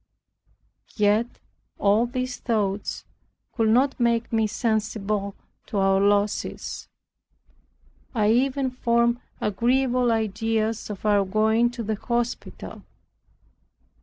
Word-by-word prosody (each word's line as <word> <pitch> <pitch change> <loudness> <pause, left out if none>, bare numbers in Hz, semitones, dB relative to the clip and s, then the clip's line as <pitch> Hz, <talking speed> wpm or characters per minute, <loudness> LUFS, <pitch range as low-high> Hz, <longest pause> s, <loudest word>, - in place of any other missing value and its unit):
Yet 210 +2 +3 0.5
all 210 +4 +3
these 255 0 -3
thoughts 205 -4 -2 0.5
could 225 -2 +1
not 265 +5 +3
make 235 -1 +1
me 220 -1 +2
sensible 215 -2 -1 0.3
to 210 - -4
our 195 0 +3
losses. 205 +1 0 1.3
I 215 -1 +3
even 260 +2 +1
formed 235 -1 +1 0.2
agreeable 245 +4 +1
ideas 220 0 -1
of 210 0 -7
our 205 -1 +4
going 220 +4 +2
to 240 -1 -6
the 220 +1 -1
hospital. 240 +2 -4
225 Hz, 100 wpm, -24 LUFS, 210-240 Hz, 1.3 s, our